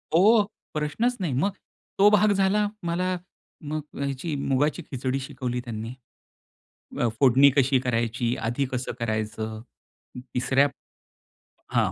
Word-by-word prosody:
हो. 210 +5 +6 0.3
प्रश्नच 155 +12 0
नाही. 160 -8 -1
मग 175 +11 +1 0.5
तो 205 +1 +7
भाग 210 0 +5
झाला. 200 +1 +2 0.2
मला 180 +2 0 0.5
मग 155 0 -2 0.2
अ, - - -6
ह्याची 140 +3 -3
मुगाची 140 +4 0
खिचडी 130 0 -1
शिकवली 130 -2 -4
त्यांनी 115 0 -5 1.1
अ, 120 - +3
फोडणी 135 +1 +7
कशी 135 0 +4
करायची? 120 -1 0
आधी 120 +4 -1
कसं 125 0 -2
करायचं? 110 -1 -3 0.7
तिसऱ्या 135 +3 +3 1.1
हां. - - +3
135 Hz, 120 wpm, -26 LUFS, 120-175 Hz, 1.1 s, तो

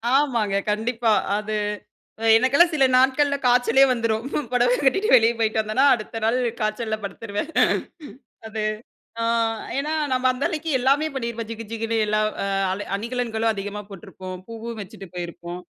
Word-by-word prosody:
ஆமாங்க. 235 -8 +1 0.2
கண்டிப்பா 225 +1 0 0.3
அது 215 0 -4 0.8
எனக்கெல்லாம் 280 +9 +4
சில 270 -2 +4
நாட்கள்ல 280 +2 +3
காய்ச்சலே 245 +2 +4
வந்துரும். 230 -1 -1 0.3
புடவ 245 0 +3
கட்டிட்டு 390 +11 +2
வெளியே 230 0 +5
போய்ட்டு 220 0 +1
வந்தேன்னா 215 +6 +1
அடுத்த 225 0 -4
நாள் 235 +3 +2 0.2
காய்ச்சல்ல 215 +1 -1
படுத்துருவேன். 205 +8 -5 1.0
அது 220 0 -4 0.6
அ - - 0 0.5
ஏன்னா 300 +3 -1 0.2
நம்ம 255 0 +2
அந்த 260 +3 -2
அளவுக்கு 320 0 -4
எல்லாமே 280 +5 +2
பண்ணியிருப்போம் 235 -3 -4
ஜிகு 230 0 -6
ஜிகுன்னு 225 0 -2
எல்லா 215 0 +1 0.2
அ - - -1 0.5
அணிகலன்களும் 230 -1 -1
அதிகமா 205 0 -5
போட்டிருப்போம். 185 0 -9
பூவும் 230 0 -7
வச்சுட்டு 195 0 -10
போயிருப்போம். 175 0 -6
230 Hz, 135 wpm, -23 LUFS, 215-255 Hz, 1.0 s, வெளியே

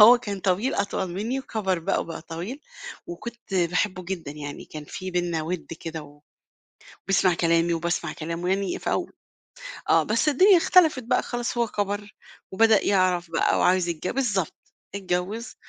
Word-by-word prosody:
هو 240 +3 +10
كان 200 -4 -5
طويل 195 +8 +1
أطول 200 -1 -1
مني 220 +9 -2
وكبر 200 -8 -1
بقى 165 - 0
وبقى 165 -1 -6
طويل، 175 - -6 0.5
وكنت 230 +3 -8
باحبه 180 +1 +1
جدًا 175 -6 -4
يعني 145 -1 -7
كان 155 -1 -9
في 185 +5 -6
بيننا 175 -3 -1
ود 175 +2 -4
كده، 160 -1 -5
و 145 0 -16 0.9
بيسمع 190 -2 +3
كلامي 170 0 +2
وباسمع 170 +1 -1
كلامه 170 +3 -4
يعني 195 0 0
في - - -3
أو - - -1 0.8
آه، - - +5
بس 230 +8 +2
الدنيا 370 +7 +6
اختلفت 325 -6 +4
بقى 230 - +1
خلاص 240 0 -3
هو 235 -1 +2
كبر 205 0 -3 0.4
وبدأ 220 +1 +4
يعرف 180 -3 +2
بقى - - +2
وعايز 180 -1 +3
يتج 170 +1 -3
بالضبط، 215 - 0 0.4
اتجوّز، 195 +4 -3
185 Hz, 155 wpm, -25 LUFS, 170-220 Hz, 0.9 s, هو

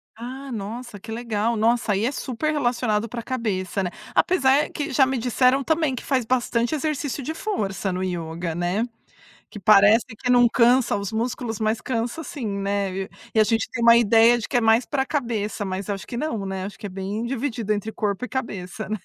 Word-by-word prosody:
Ah, 260 +4 -7
nossa, 225 0 -6
que 220 +3 -9
legal! 230 -1 -1
Nossa. 230 0 +2
Aí, 200 +3 +1
é 260 - +1
super 285 +3 -2
relacionado 240 -6 0
pra 235 -1 -5
cabeça, 200 -6 -2
né. 180 - -1 0.3
Apesar 280 -5 +3
que 300 +1 -4
já 265 +1 +5
me 265 0 -1
disseram 255 +3 +2
também 315 -3 +1
que - - -7
faz 260 -4 0
bastante 240 +1 0
exercício 295 -2 -2
de 315 - -3
força 200 - -2
no 185 +1 -2
ioga, 170 -2 -3
né. 175 +6 0 0.7
Que 210 - -8
parece 205 +3 +6
que 250 +3 -2
não 245 -1 +6
cansa 240 -1 +3
os 200 0 -3
músculos, 230 -1 -2
mas 220 +1 0
cansa 245 +5 -2
sim, 285 -7 -6
né. 200 0 -1
E 190 +1 -3
e - - -12 0.3
e 220 - +4
a - - +6
gente 225 +1 0
tem 230 - -3
uma 235 0 +8
ideia 230 +1 +5
de 225 - -5
que - - 0
é 245 - +4
mais 225 +2 +3
pra 270 -2 0
cabeça, 230 -7 -2
mas 190 +1 -4
acho 195 -1 -4
que 240 - -6
não, 235 -8 -2
né, 190 -1 -4
acho 200 - -7
que 205 - -6
é - - -4
bem 195 +4 -4
dividido 235 -4 -2
entre 210 +1 -3
corpo 210 +2 -2
e - - -5
cabeça, 205 -5 -5
né. 215 0 -2
230 Hz, 210 wpm, -23 LUFS, 205-255 Hz, 0.7 s, uma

